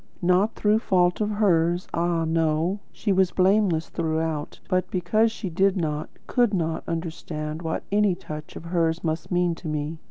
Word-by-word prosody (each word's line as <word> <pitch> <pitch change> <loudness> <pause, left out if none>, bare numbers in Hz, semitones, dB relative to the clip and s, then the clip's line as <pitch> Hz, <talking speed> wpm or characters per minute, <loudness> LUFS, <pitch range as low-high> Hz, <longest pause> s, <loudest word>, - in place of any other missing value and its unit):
Not 185 +5 +3
through 210 +1 +3
fault 180 -3 +2
of 210 - +1
hers, 175 -4 +2
ah, 170 -1 +1
no; 165 +3 +1
she 210 - -2
was 190 -1 +3
blameless 185 -4 +2
throughout; 160 -2 -2
but 185 -1 0
because 215 +5 +2
she 220 -2 -5
did 195 +3 +2
not, 155 -3 -2 0.2
could 240 -5 +2
not, 165 -2 -1
understand 160 -2 -4
what 160 -1 -3
any 205 -2 +3
touch 155 -4 -8
of - - -8
hers 165 -1 0
must 160 0 -2
mean 175 -1 +2
to 165 - -8
me. 155 +1 -3
175 Hz, 165 wpm, -25 LUFS, 160-195 Hz, 0.2 s, Not